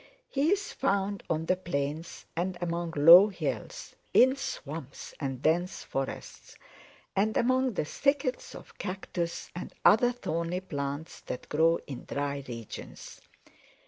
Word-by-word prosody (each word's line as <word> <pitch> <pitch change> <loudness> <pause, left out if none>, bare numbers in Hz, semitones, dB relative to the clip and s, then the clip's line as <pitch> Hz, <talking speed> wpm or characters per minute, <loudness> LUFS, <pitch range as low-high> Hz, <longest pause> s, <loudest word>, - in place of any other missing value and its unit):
He 285 +3 +2
is 405 0 0
found 200 0 0
on 160 0 0
the 185 - +2
plains 160 -2 -4
and 175 +2 -1
among 170 -1 -2
low 170 +7 +10
hills, 200 - -5 0.2
in 260 +2 +7
swamps 155 - -6
and 135 -3 -4
dense 175 +4 +1
forests, 135 0 -5 0.6
and 215 +3 +2
among 255 0 +2
the 155 - 0
thickets 275 - -1
of - - -13
cactus 180 -3 -4
and 180 - -7
other 240 +4 +6
thorny 175 -6 -2
plants 145 -3 -5
that - - -6
grow 165 +2 +4
in 135 -3 -8
dry 140 0 -3
regions. 115 -3 -8
170 Hz, 130 wpm, -29 LUFS, 150-205 Hz, 0.6 s, low